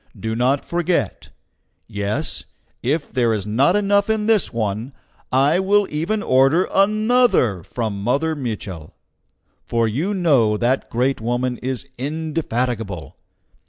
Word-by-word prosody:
Do 110 0 -3
not 130 +4 +1
forget. 175 0 -1 0.6
Yes! 105 -1 -3 0.4
if 145 +5 -1
there 120 -3 +2
is 105 -3 -2
not 130 - +2
enough 205 0 +2
in 220 -1 +1
this 220 -2 +3
one, 110 +3 -3 0.4
I 140 +7 +3
will 200 +2 +3
even 180 +8 -1
order 135 +7 +3
ANOTHER 215 - +3
from 105 +1 -4
Mother 145 +9 0
Mitchel; 105 - -6 0.7
for 115 -1 0
you 155 - -1
know 135 - +3
that 125 +4 0
great 125 +1 0
woman 120 +2 -1
is 130 +1 -4
indefatigable. 125 - -3
130 Hz, 125 wpm, -21 LUFS, 115-175 Hz, 0.7 s, this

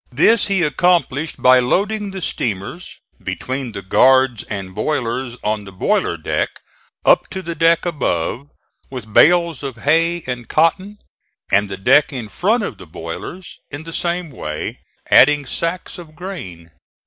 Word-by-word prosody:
This 190 - +4
he 195 -3 +1
accomplished 160 -1 +1
by 130 0 +7
loading 200 - 0
the 190 -1 -7
steamers, 115 - -3 0.3
between 130 -1 -4
the 100 -1 -6
guards 130 +3 +4
and 95 -3 -6
boilers 120 +1 -2
on 105 0 -1
the 100 - -11
boiler 90 - 0
deck - - -1 0.6
up - - +4
to 190 - -6
the 170 - -4
deck 165 +2 +3
above, 140 - -2 0.4
with 115 -5 -8
bales 170 -1 +4
of 135 -4 -5
hay 165 +6 +1
and 125 -2 -5
cotton, 185 +6 +1 0.5
and 100 0 +3
the 95 - -5
deck 145 +11 +4
in 120 -6 -6
front 215 - +1
of - - -5
the - - -12
boilers 85 - -8
in 145 +2 -7
the 165 0 -9
same 175 -2 -2
way, 75 - -5 0.3
adding 145 +1 +6
sacks 170 +6 -4
of 155 -3 -12
grain. 95 - -8
145 Hz, 150 wpm, -19 LUFS, 115-175 Hz, 0.6 s, by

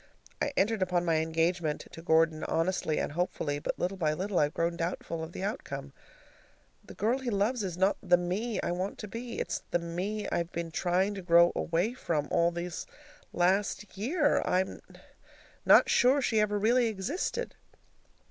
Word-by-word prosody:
I 285 - +1
entered 215 +1 +2
upon 180 -1 +1
my 165 -2 +2
engagement 160 0 0
to 165 - -10
Gordon 160 -1 +2
honestly 165 -1 0
and - - -1
hopefully, 150 -3 -2
but - - -3
little 190 +2 -2
by 155 -4 +1
little 190 +3 -1
I've 145 +1 +1
grown 170 +1 0
doubtful 165 -1 -3
of 160 - -7
the 185 - -6
outcome. 210 +6 -5 0.9
The - - -12
girl 235 +5 +1
he 260 -2 -3
loves 215 +3 0
is 180 -3 -4
not 190 +2 +2
the 180 -2 +4
ME 195 +6 -2
I - - -1
want 185 +3 -3
to 210 - -7
be. 235 +3 -6
It's - - -2
the - - +2
ME 180 +5 -3
I've 170 +1 -1
been 170 -1 -4
trying 185 +4 +1
to 195 - -6
grow 170 -1 +5
away 175 +8 0
from 155 - -2
all 170 0 +3
this 170 0 -5 0.4
last 195 +3 0
year. 290 - +1
I'm 185 +1 0 0.9
not - - +7
sure 260 +4 +4
she 230 -5 +1
ever 210 -1 +1
really 235 +4 +3
existed. 280 - -3
180 Hz, 175 wpm, -30 LUFS, 170-210 Hz, 0.9 s, not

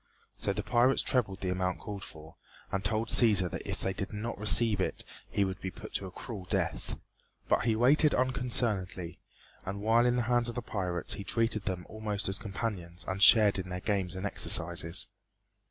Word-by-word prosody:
So - - -2
the - - -3
pirates 125 +2 +3
trebled 105 -7 0
the 90 -2 -1
amount 90 0 -1
called 100 -2 -7
for, 80 +1 -12 0.4
and 95 0 -2
told 110 +2 -1
Cæsar 100 -7 +5
that - - -6
if - - -4
they 95 - -1
did 95 0 -5
not 110 +3 -4
receive 105 -1 +2
it - - -3 0.2
he 100 - +1
would 95 0 -5
be 95 - -3
put - - -11
to 95 - -2
a - - -10
cruel 100 -1 -7
death, 90 - -2 0.5
but - - +2
he 115 -2 +2
waited 145 +6 +4
unconcernedly; 115 -9 -1 0.4
and 100 +2 -5
while 115 +2 +4
in 125 - +2
the 125 - +1
hands 120 0 +2
of 120 - -6
the 120 - -4
pirates 90 -6 -2
he 100 - -6
treated 115 0 0
them 90 -3 -3
almost 105 -2 -4
as 95 0 -2
companions 100 -5 -4
and 95 +1 -3
shared 105 -2 +7
in 90 0 -5
their 90 0 -4
games 95 -2 -1
and 95 +2 -4
exercises. 85 -2 +2
100 Hz, 195 wpm, -30 LUFS, 95-115 Hz, 0.5 s, shared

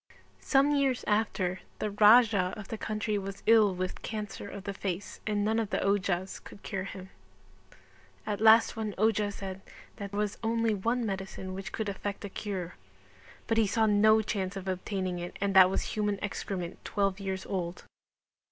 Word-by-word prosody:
Some 275 +1 +3
years 275 -3 +1
after 200 -4 0 0.2
the 210 - -2
Raja 210 -3 +5
of 210 -2 -9
the 225 - -4
country 215 -1 -1
was 195 0 -7
ill 215 -4 +5
with 185 0 -4
cancer 210 -2 -5
of 200 -1 -8
the 200 - -4
face 190 -1 -5
and 205 -1 +1
none 220 +1 +2
of 220 -3 -1
the - - 0
ojhas 195 -2 0
could 200 - -13
cure 190 -1 -3
him. 190 -1 -9 1.1
At 205 0 -3
last 225 +1 +6
one 215 -3 -3
ojha 210 0 +2
said 195 -1 -7 0.4
that 200 -2 -5
there 200 - -6
was 210 -1 -1
only 230 0 +1
one 230 +4 0
medicine 190 -2 -5
which 195 +1 -6
could 220 - -3
effect 200 +1 -4
a - - -5
cure, 190 -4 -5 0.7
but 225 0 +1
he 220 - +3
saw 220 +3 +2
no 215 +1 +5
chance 195 -2 -2
of 195 -1 -6
obtaining 185 -1 -2
it 175 0 -6
and 200 0 0
that 185 -1 +9
was 190 - -1
human 210 -1 -1
excrement 190 -3 -4
12 200 -1 0
years 190 -1 -4
old. 175 -2 -4
200 Hz, 180 wpm, -30 LUFS, 190-215 Hz, 1.1 s, that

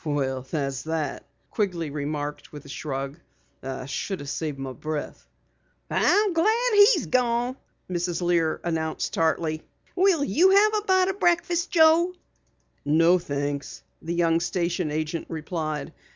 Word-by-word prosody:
"Well, 135 -4 -1
that's 135 0 -3
that," 160 -3 -3 0.3
Quigley 175 -8 -2
remarked 145 0 -4
with 145 -1 -10
a - - -12
shrug. 140 +1 -5 0.4
"I 130 -1 -5
should 185 +7 -4
have 140 - -7
saved 155 -4 -3
my 135 -1 -5
breath." 155 +4 -5 0.6
"I'm 410 -2 +3
glad 445 +8 +2
he's 410 +3 +6
gone," 245 0 +1 0.3
Mrs. 175 -1 -2
Lear 170 -3 +1
announced 160 -2 -2
tartly. 160 -1 0 0.3
"Will 370 -5 +3
you 330 - +4
have 410 +3 +5
a 425 - +1
bite 375 0 +4
o' - - 0
breakfast, 350 -1 +1
Joe?" 335 +2 +4 0.7
"No, 165 +5 +4
thanks," 145 -2 -4 0.2
the 170 +1 -3
young 165 -1 +2
station 175 -1 -1
agent 155 +2 -3
replied. 155 -1 -4
165 Hz, 135 wpm, -25 LUFS, -, 0.7 s, he's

